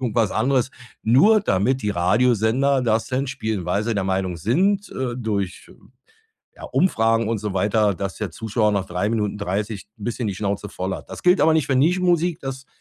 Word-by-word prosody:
irgendwas 115 -4 +1
anderes, 130 -1 +1 0.3
nur 155 - +5
damit 125 - 0
die 105 - 0
Radiosender 115 +8 +2
das 110 -2 +1
denn 130 +2 -1
spielen, 110 -7 -3
weil 100 +4 0
sie 115 0 -1
der 100 - 0
Meinung 95 -2 -1
sind, 190 - +1
äh, 130 -2 -3
durch, 105 -6 -3 0.9
ja, - - -11
Umfragen 115 - +1
und 115 -1 -1
so 105 -1 -4
weiter, 105 +1 +2
dass 95 +1 -5
der 105 -4 -4
Zuschauer 110 +2 0
nach 100 -2 0
3 90 +4 -1
Minuten 105 -2 -1
30 100 +1 -3
'n - - -13
bisschen 120 0 -3
die 100 - -2
Schnauze 100 +1 -3
voll 95 0 -4
hat. - - -13
Das - - -9
gilt 180 +1 +4
aber 160 +2 +5
nicht 155 -4 +2
für 135 - +2
Nischen-Musik, 175 +3 +2
das 135 0 -6
110 Hz, 190 wpm, -22 LUFS, 100-130 Hz, 0.9 s, nur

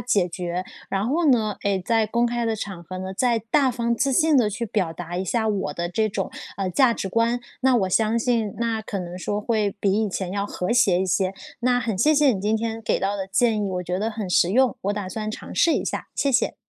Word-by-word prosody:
通 - - -23
解 200 -7 +2
决， 175 +1 -4 0.2
然 195 +2 -1
后 320 +3 +2
呢， 215 -5 +2
诶， 200 -2 +1
再 225 0 +2
在 - - -3
公 235 +3 +1
开 235 -1 -1
场 195 -4 -6
合 185 +2 -7
呢， 190 0 -5
再 235 +2 +1
大 280 -3 +4
方 235 -1 -1
自 270 +3 +1
信 310 +1 +4
地 230 -5 +4
去 235 +4 -3
表 190 -6 -1
达 175 +1 -6
一 185 - -1
下 220 +3 0
我 195 -8 -1
的 175 0 -2
这 215 +5 0
种， - - -3 0.3
呃， 195 -1 -1
价 260 +3 +4
值 195 - -4
观， 230 +4 +1 0.2
那 260 -1 +4
我 195 -5 +1
相 220 +4 +2
信 230 -3 0
那 230 -1 -1
可 205 -2 -4
能 175 0 -7
说 205 +3 -2
会 210 -2 0
比 195 - +2
以 210 - -1
前 185 -1 -3
要 200 +1 -2
和 180 +3 -2
谐 195 -7 +4
一 190 - 0
些。 190 +1 0 0.3
那 245 0 +2
很 225 -5 -2
谢 305 +8 +4
谢 290 -2 +5
你 195 - -3
今 210 +3 +1
天 225 0 -3
给 - - 0
到 200 +1 0
的 190 -1 -4
建 220 +4 +2
议， - - -1
我 180 -1 -2
觉 180 +1 -2
得 220 +2 0
很 215 -3 -5
实 175 0 +4
用， 255 +4 +3
我 200 - 0
打 205 -2 -4
算 215 +2 -4
尝 - - -8
试 335 - +4
一 - - -1
下， - - -4
谢 280 - +1
谢。 240 - +2
215 Hz, 275 characters per minute, -23 LUFS, 190-235 Hz, 0.3 s, 谢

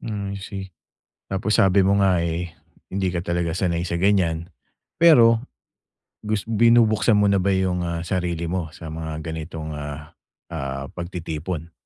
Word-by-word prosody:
Mm, 100 -2 -4
I - - -11
see. 95 -1 -6 0.7
Tapos 95 +3 0
sabi 100 0 +4
mo 100 +1 +3
nga, 95 -3 +3
eh, 85 0 -2 0.4
hindi 95 -1 0
ka 90 0 -3
talaga 85 -1 -1
sanay 85 -2 0
sa 85 - -1
ganyan. 85 -3 +1 0.5
Pero, 115 -9 +7 0.8
gus 105 -2 -2
binubuksan 115 -1 +4
mo 105 -1 +4
na 100 -1 +3
ba 100 +1 +2
yung, 95 -1 0
ah, 85 0 -3
sarili 85 -2 -2
mo 90 -3 -2
sa 80 -2 -8
mga 80 -1 -5
ganitong, 80 -1 -5
ah, 75 0 -7 0.4
ah, 70 0 -4
pagtitipon? 85 -1 -5
90 Hz, 150 wpm, -23 LUFS, 80-100 Hz, 0.8 s, Pero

